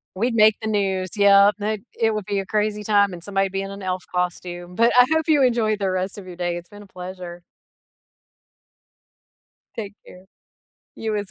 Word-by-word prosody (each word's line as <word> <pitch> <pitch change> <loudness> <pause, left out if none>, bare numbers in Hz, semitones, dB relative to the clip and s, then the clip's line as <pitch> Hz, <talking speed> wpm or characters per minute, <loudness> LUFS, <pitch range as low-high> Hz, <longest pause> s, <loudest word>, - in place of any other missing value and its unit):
We'd 230 +4 0
make 215 -1 +5
the 220 - -3
news, 190 -3 0
yep, 200 0 +6
it 210 0 -2 0.2
it 225 -1 +2
would 215 -2 -3
be 200 0 -2
a 195 - -4
crazy 210 +1 -1
time 200 -2 +3
and 170 -1 -9
somebody 195 -1 0
would 190 - -5
be 195 - -2
in 195 - -7
an 200 0 -9
elf 185 -1 -3
costume, 180 0 -3
but 230 +4 +4
I 250 0 +8
hope 320 0 +1
you 300 -3 +4
enjoy 230 -4 +2
the 195 -2 -2
rest 185 +2 -2
of 185 - -12
your 180 - -9
day, 175 -1 -2
it's 175 0 -8
been 205 0 -12
a - - -15
pleasure. 180 -2 -9 2.3
Take 205 -2 -6
care. 185 +1 -15 0.7
You 220 -1 -3
as 205 -2 -4
200 Hz, 200 wpm, -22 LUFS, 185-215 Hz, 2.3 s, I